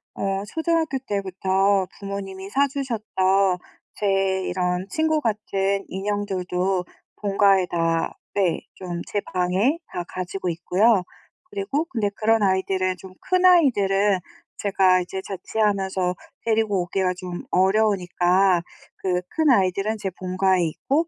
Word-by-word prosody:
어 195 0 -1
초등학교 320 +3 0
때부터 195 0 +1
부모님이 195 -1 -6
사 280 +6 +2
주셨던 200 -8 +1 0.4
제 195 -2 +1
이런 180 0 -1
친구 315 -1 +1
같은 200 -4 -1
인형들도 190 -2 -1 0.4
본가에 195 -2 +3
다 165 -1 0 0.2
네 185 -4 +1
좀 175 -2 -5
제 205 - -1
방에 185 - +2
다 175 - -4
가지고 185 +1 -5
있고요. 185 +5 +2 0.5
그리고 205 +10 -1
근데 220 -10 0
그런 225 0 +2
아이들은 190 -1 +1
좀 185 0 -12
큰 365 -1 +1
아이들은 205 - +4 0.4
제가 190 -2 +3
이제 190 +2 -5
자취하면서 195 -2 -1 0.3
데리고 220 -4 +2
오기가 185 +1 0
좀 180 -1 -6
어려우니까 185 -2 +3 0.4
그 180 -1 +1
큰 315 -2 +1
아이들은 200 -1 +2
제 195 - -2
본가에 185 0 +1
있고 280 - 0
195 Hz, 265 characters per minute, -23 LUFS, 185-210 Hz, 0.5 s, 아이들은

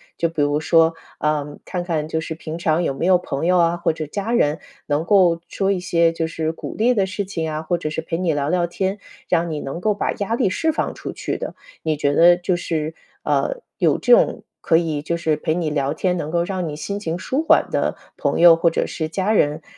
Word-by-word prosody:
就 170 - 0
比 155 -3 0
如 145 +1 +1
说， 165 +1 +4 0.3
呃， 150 -1 -1
看 180 -2 -3
看 160 -4 -2
就 160 0 -2
是 160 0 -5
平 160 0 -6
常 170 0 +1
有 140 - 0
没 165 - -3
有 185 -1 +6
朋 165 -3 -3
友 180 0 +4
啊， 170 0 +3
或 170 - +1
者 155 -1 -5
家 200 +9 -4
人 155 -9 +2 0.3
能 145 +1 0
够 175 -4 +4
说 195 0 0
一 195 - 0
些 170 -2 +2
就 165 -1 -2
是 160 -1 -2
鼓 165 - -8
励 240 +3 +3
的 195 -4 +1
事 200 +1 -3
情 165 -4 -3
啊、 155 +1 -4
或 175 +2 0
者 155 - -3
是 155 - -4
陪 165 +1 -3
你 180 -3 +1
聊 145 -1 -1
聊 175 +2 +1
天， 190 +3 -2 0.3
让 170 -1 +1
你 155 - -3
能 145 +5 -5
够 210 0 +1
把 - - -1
压 210 +3 -2
力 195 - +1
释 320 +11 +1
放 310 - -2
出 - - -7
去 - - -4
的。 - - -5 0.3
你 155 -1 -1
觉 145 -1 +1
得 175 +3 +6
就 180 0 0
是， 160 -2 -2 0.3
呃， - - 0 0.2
有 - - +3
这 - - +4
种 - - +3 0.2
可 160 - +3
以 160 -3 -1
就 170 +3 -2
是 160 -2 +1
陪 155 +1 -1
你 165 -4 -1
聊 140 -1 0
天、 180 +1 0
能 160 -4 -3
够 170 +1 +1
让 180 -2 -3
你 150 - -5
心 200 +6 -4
情 170 -3 -3
舒 270 - -2
缓 - - +4
的 - - 0 0.2
朋 - - -1
友 170 -1 +9
或 170 +1 +3
者 165 - -1
是 155 -1 -4
家 195 +5 0
人， 150 -5 +1
165 Hz, 265 characters per minute, -21 LUFS, 155-185 Hz, 0.3 s, 友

